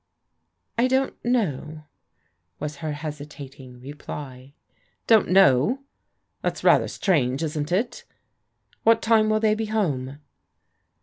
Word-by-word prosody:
"I 245 Hz, -, +4 dB
don't 265 Hz, +1 st, +1 dB
how," 155 Hz, -, -1 dB, 0.7 s
was 150 Hz, 0 st, -5 dB
her 155 Hz, 0 st, -4 dB
hesitating 145 Hz, -4 st, -9 dB
reply. 135 Hz, -1 st, -9 dB, 0.2 s
" -, -, -42 dB
Don't 220 Hz, -2 st, +4 dB
know 190 Hz, -, +4 dB
?_ -, -, -30 dB, 0.6 s
That's -, -, -3 dB
rather -, -, +5 dB
strange, 140 Hz, -6 st, 0 dB
isn't 150 Hz, 0 st, -3 dB
it? 235 Hz, -, -1 dB, 0.8 s
What 225 Hz, 0 st, +4 dB
time 220 Hz, -1 st, +4 dB
will 215 Hz, 0 st, +2 dB
they 215 Hz, -1 st, +3 dB
be 220 Hz, 0 st, -2 dB
home? 145 Hz, -11 st, -1 dB
155 Hz, 120 wpm, -24 LUFS, 140-220 Hz, 0.8 s, rather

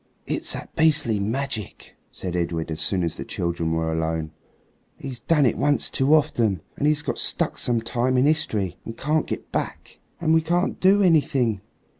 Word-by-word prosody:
"It's -, -, -2 dB
that -, -, -8 dB
beastly 150 Hz, -9 st, +3 dB
magic," 110 Hz, 0 st, -4 dB, 0.2 s
said 90 Hz, -2 st, -5 dB
Edred 85 Hz, -2 st, -2 dB
as 80 Hz, -, -2 dB
soon 95 Hz, -3 st, +1 dB
as 85 Hz, -, -2 dB
the -, -, -4 dB
children 85 Hz, -2 st, -2 dB
were 80 Hz, 0 st, 0 dB
alone. 80 Hz, -1 st, -2 dB, 0.7 s
"He's 130 Hz, -3 st, -7 dB
done 150 Hz, +1 st, +3 dB
it 120 Hz, -, +1 dB
once 145 Hz, 0 st, +1 dB
too 140 Hz, +4 st, +4 dB
often, 115 Hz, -, +1 dB
and 145 Hz, -, 0 dB
he's 150 Hz, -1 st, +2 dB
got -, -, -3 dB
stuck -, -, 0 dB
some 120 Hz, -2 st, 0 dB
time 125 Hz, +3 st, 0 dB
in 125 Hz, -, +4 dB
history 105 Hz, -, 0 dB
and 115 Hz, -, -8 dB
can't 155 Hz, +2 st, 0 dB
get -, -, -5 dB
back." -, -, -4 dB, 0.2 s
"And 160 Hz, -2 st, +2 dB
we 160 Hz, -, +5 dB
can't 175 Hz, +3 st, 0 dB
do 200 Hz, +2 st, +5 dB
anything. 140 Hz, -, +2 dB
120 Hz, 180 wpm, -24 LUFS, 90-150 Hz, 0.7 s, we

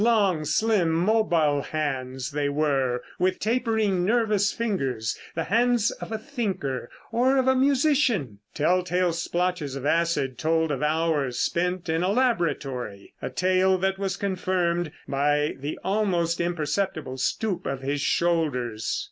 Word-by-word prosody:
Long, 200 Hz, -9 st, +3 dB
slim, 185 Hz, +3 st, +2 dB
mobile 165 Hz, -5 st, +2 dB
hands 135 Hz, -3 st, -3 dB
they 145 Hz, 0 st, 0 dB
were, 135 Hz, -4 st, 0 dB, 0.2 s
with 185 Hz, 0 st, +1 dB
tapering 220 Hz, -5 st, +1 dB
nervous 210 Hz, -1 st, +2 dB
fingers 135 Hz, -, -2 dB, 0.2 s
the 165 Hz, -, -1 dB
hands 235 Hz, +2 st, +2 dB
of -, -, -8 dB
a 220 Hz, -, -1 dB
thinker 195 Hz, -, -3 dB, 0.2 s
or 255 Hz, +4 st, +3 dB
of 260 Hz, -1 st, +2 dB
a 260 Hz, -, +5 dB
musician. 260 Hz, -, +2 dB, 0.2 s
Telltale 180 Hz, +2 st, +1 dB
splotches 175 Hz, -4 st, -1 dB
of 135 Hz, 0 st, -5 dB
acid 165 Hz, -5 st, +1 dB
told 160 Hz, 0 st, +1 dB
of 135 Hz, -, -2 dB
hours 150 Hz, -4 st, 0 dB
spent 180 Hz, +1 st, -1 dB
in 160 Hz, +1 st, 0 dB
a 180 Hz, -, +1 dB
laboratory, 145 Hz, -, -1 dB
a -, -, -3 dB
tale 185 Hz, +7 st, +2 dB
that 190 Hz, +1 st, -1 dB
was 195 Hz, -1 st, -2 dB
confirmed 180 Hz, -4 st, -1 dB, 0.2 s
by 145 Hz, +2 st, +1 dB
the 145 Hz, +3 st, -4 dB
almost 185 Hz, -5 st, +1 dB
imperceptible 165 Hz, -4 st, -2 dB
stoop 195 Hz, +7 st, -1 dB
of 135 Hz, -1 st, -3 dB
his 140 Hz, +1 st, -2 dB
shoulders. 140 Hz, -10 st, 0 dB
170 Hz, 135 wpm, -25 LUFS, 145-200 Hz, 0.2 s, a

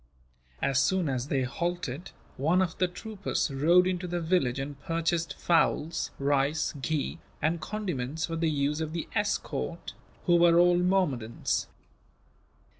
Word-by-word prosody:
As 135 Hz, -1 st, +2 dB
soon 185 Hz, 0 st, +2 dB
as 130 Hz, -1 st, -2 dB
they 135 Hz, -2 st, +1 dB
halted, 175 Hz, +1 st, -3 dB, 0.3 s
one 160 Hz, +7 st, +2 dB
of 185 Hz, -3 st, 0 dB
the 185 Hz, -, +3 dB
troopers 195 Hz, -3 st, -3 dB
rode 170 Hz, +7 st, +4 dB
into 180 Hz, -1 st, -1 dB
the 175 Hz, 0 st, -2 dB
village 160 Hz, -7 st, +1 dB
and 140 Hz, +1 st, -5 dB
purchased 165 Hz, 0 st, -1 dB
fowls, 165 Hz, -1 st, +1 dB
rice, 140 Hz, +2 st, +1 dB
ghee, 155 Hz, +2 st, -2 dB, 0.2 s
and 160 Hz, +1 st, 0 dB
condiments 160 Hz, -9 st, -3 dB
for 165 Hz, -, -4 dB
the 165 Hz, 0 st, +1 dB
use 150 Hz, +1 st, 0 dB
of 155 Hz, 0 st, -3 dB
the 170 Hz, -, -3 dB
escort, 65 Hz, -, -2 dB, 0.3 s
who 175 Hz, -1 st, +5 dB
were 170 Hz, 0 st, +5 dB
all 175 Hz, 0 st, +5 dB
Mahommedans. 180 Hz, -12 st, 0 dB
165 Hz, 140 wpm, -28 LUFS, 140-175 Hz, 0.3 s, who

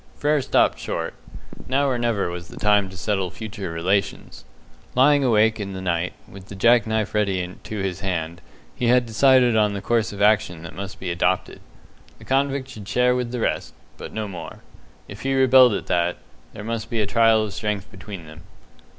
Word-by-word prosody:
Frere 150 Hz, 0 st, +1 dB
stopped -, -, +2 dB
short. -, -, -4 dB, 0.5 s
Now 140 Hz, +2 st, +1 dB
or 125 Hz, -3 st, 0 dB
never 115 Hz, -7 st, 0 dB
was 85 Hz, 0 st, -7 dB
the -, -, -13 dB
time 105 Hz, -2 st, +2 dB
to 95 Hz, -, -12 dB
settle 95 Hz, -1 st, -1 dB
future 100 Hz, -1 st, -7 dB
relations. 95 Hz, +5 st, -2 dB, 0.5 s
Lying 140 Hz, +2 st, +5 dB
awake 110 Hz, -2 st, +3 dB
in 100 Hz, -2 st, -5 dB
the 95 Hz, -, -5 dB
night, 90 Hz, -1 st, -1 dB
with 95 Hz, -1 st, -13 dB
the 100 Hz, -, -9 dB
jack 115 Hz, +3 st, +4 dB
knife 110 Hz, -1 st, -1 dB
ready 95 Hz, -4 st, -1 dB
to 110 Hz, -, -6 dB
his 95 Hz, -3 st, -3 dB
hand, 85 Hz, -3 st, -3 dB, 0.3 s
he 120 Hz, -, -1 dB
had 125 Hz, +1 st, +4 dB
decided 125 Hz, +1 st, +4 dB
on 105 Hz, -2 st, +3 dB
the 100 Hz, -, -3 dB
course 115 Hz, +2 st, 0 dB
of 100 Hz, -, -9 dB
action 105 Hz, -5 st, +2 dB
that 80 Hz, -, -9 dB
must 95 Hz, +3 st, -7 dB
be 90 Hz, -2 st, -3 dB
adopted. 90 Hz, +1 st, -1 dB, 0.6 s
The -, -, -15 dB
convict 135 Hz, 0 st, 0 dB
should 105 Hz, -6 st, -10 dB
share 125 Hz, +2 st, +2 dB
with 125 Hz, -1 st, -2 dB
the 125 Hz, -2 st, -3 dB
rest, -, -, -2 dB, 0.2 s
but -, -, -8 dB
no 110 Hz, -1 st, -4 dB
more. 95 Hz, -3 st, -9 dB, 0.4 s
If 105 Hz, +2 st, -10 dB
he 135 Hz, +2 st, 0 dB
rebelled 130 Hz, -2 st, +6 dB
at -, -, -4 dB
that, 85 Hz, 0 st, 0 dB, 0.4 s
there 105 Hz, -, -8 dB
must 115 Hz, 0 st, -4 dB
be 115 Hz, -, -2 dB
a 105 Hz, -, +2 dB
trial 110 Hz, +1 st, +4 dB
of 105 Hz, -2 st, -5 dB
strength 105 Hz, -2 st, -3 dB
between 95 Hz, -3 st, -9 dB
them. 80 Hz, 0 st, -13 dB
105 Hz, 195 wpm, -23 LUFS, 95-120 Hz, 0.6 s, rebelled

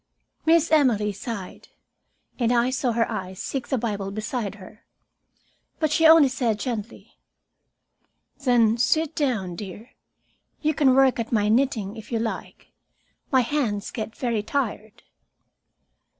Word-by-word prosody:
Miss 330 Hz, 0 st, +4 dB
Emily 240 Hz, -9 st, +3 dB
sighed, 200 Hz, -2 st, -7 dB, 0.7 s
and 235 Hz, -1 st, +2 dB
I 245 Hz, +1 st, +2 dB
saw 255 Hz, -2 st, 0 dB
her 230 Hz, 0 st, +1 dB
eyes 190 Hz, -4 st, -5 dB
seek 265 Hz, -3 st, -4 dB
the 265 Hz, -, 0 dB
Bible 205 Hz, -4 st, -3 dB
beside 215 Hz, 0 st, -4 dB
her. 210 Hz, +2 st, -14 dB, 0.9 s
But 310 Hz, -2 st, 0 dB
she 320 Hz, +1 st, +5 dB
only 320 Hz, -3 st, +8 dB
said 245 Hz, -5 st, -1 dB
gently: 230 Hz, -2 st, -6 dB, 1.2 s
"Then 235 Hz, -3 st, +3 dB
sit 315 Hz, +5 st, +2 dB
down, 225 Hz, -, -1 dB
dear. 205 Hz, +6 st, -9 dB, 0.7 s
You 310 Hz, 0 st, +1 dB
can 275 Hz, -3 st, +3 dB
work 265 Hz, -2 st, +4 dB
at 230 Hz, -, -3 dB
my 210 Hz, -2 st, +2 dB
knitting 225 Hz, -4 st, +1 dB
if 220 Hz, -, -11 dB
you 230 Hz, -, 0 dB
like. 225 Hz, 0 st, -5 dB, 0.6 s
My 260 Hz, -2 st, +5 dB
hands 235 Hz, -6 st, -2 dB
get 220 Hz, -1 st, -5 dB
very 235 Hz, -4 st, -1 dB
tired." 220 Hz, -3 st, -4 dB
235 Hz, 135 wpm, -24 LUFS, 210-270 Hz, 1.2 s, only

